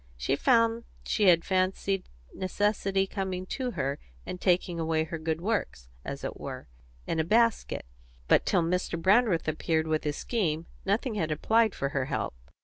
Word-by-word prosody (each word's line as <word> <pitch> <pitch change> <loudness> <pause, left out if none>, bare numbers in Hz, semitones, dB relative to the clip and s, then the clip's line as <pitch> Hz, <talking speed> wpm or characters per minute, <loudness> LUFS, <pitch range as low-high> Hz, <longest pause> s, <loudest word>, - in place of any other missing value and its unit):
She - - 0
found 230 - +3 0.2
she 210 - +1
had 170 -2 +5
fancied 190 0 0 0.2
necessity 195 0 0
coming 190 -2 -3
to 260 -2 -2
her 140 +2 -1 0.3
and 180 - -6
taking 175 -2 +2
away 160 -1 +1
her 160 +1 -5
good 160 0 -1
works, 180 - -2
as 140 0 -6
it - - -5
were, 130 - -7 0.4
in 165 - -1
a - - +3
basket; 230 +6 +2 0.4
but - - +5
till 175 - +2
Mr. 170 0 -1
Brandreth 195 -2 +3
appeared 160 +1 0
with 155 -1 0
his 150 0 -2
scheme, 170 -9 -1 0.2
nothing 220 +5 0
had 165 -7 -1
applied 220 +8 +2
for 140 - -1
her 135 -2 -1
help. 135 -1 -2
180 Hz, 165 wpm, -28 LUFS, 155-205 Hz, 0.4 s, had